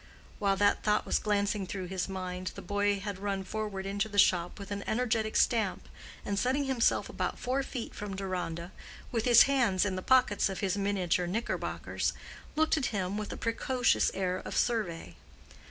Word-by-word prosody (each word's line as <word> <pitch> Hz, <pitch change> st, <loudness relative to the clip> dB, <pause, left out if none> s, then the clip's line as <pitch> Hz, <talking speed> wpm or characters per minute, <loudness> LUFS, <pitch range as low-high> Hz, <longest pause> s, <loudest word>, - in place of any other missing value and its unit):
While 200 Hz, -1 st, +2 dB
that 205 Hz, +1 st, +3 dB
thought 210 Hz, 0 st, +1 dB
was -, -, +1 dB
glancing 205 Hz, -1 st, 0 dB
through 185 Hz, 0 st, -4 dB
his 185 Hz, +1 st, -3 dB
mind, 185 Hz, -1 st, -4 dB
the -, -, -8 dB
boy 205 Hz, +1 st, +1 dB
had 200 Hz, -1 st, -5 dB
run 195 Hz, -1 st, -2 dB
forward 205 Hz, -1 st, -4 dB
into 200 Hz, +2 st, -1 dB
the 205 Hz, -, -6 dB
shop 175 Hz, -3 st, +3 dB
with 200 Hz, 0 st, -9 dB
an 200 Hz, 0 st, -3 dB
energetic 220 Hz, -2 st, 0 dB
stamp, 220 Hz, -5 st, +1 dB, 0.4 s
and 200 Hz, -1 st, -1 dB
setting 265 Hz, +3 st, +1 dB
himself 265 Hz, -4 st, +2 dB
about -, -, -3 dB
four 255 Hz, +2 st, -1 dB
feet 255 Hz, -3 st, -5 dB
from 205 Hz, -2 st, -5 dB
Deronda, 180 Hz, -3 st, -4 dB, 0.4 s
with 230 Hz, -3 st, -1 dB
his 240 Hz, -2 st, +8 dB
hands 235 Hz, -9 st, +2 dB
in 190 Hz, -2 st, -1 dB
the 185 Hz, -, -3 dB
pockets 230 Hz, -5 st, +3 dB
of 190 Hz, -, -4 dB
his 195 Hz, -2 st, 0 dB
miniature 190 Hz, -3 st, 0 dB
knickerbockers, 225 Hz, +7 st, -2 dB, 0.4 s
looked 315 Hz, +1 st, +3 dB
at 275 Hz, -, 0 dB
him 195 Hz, -2 st, -2 dB
with 210 Hz, 0 st, -4 dB
a -, -, -5 dB
precocious 245 Hz, +2 st, +1 dB
air 185 Hz, -1 st, 0 dB
of -, -, -5 dB
survey. 170 Hz, -, -1 dB
205 Hz, 180 wpm, -30 LUFS, 190-225 Hz, 0.4 s, his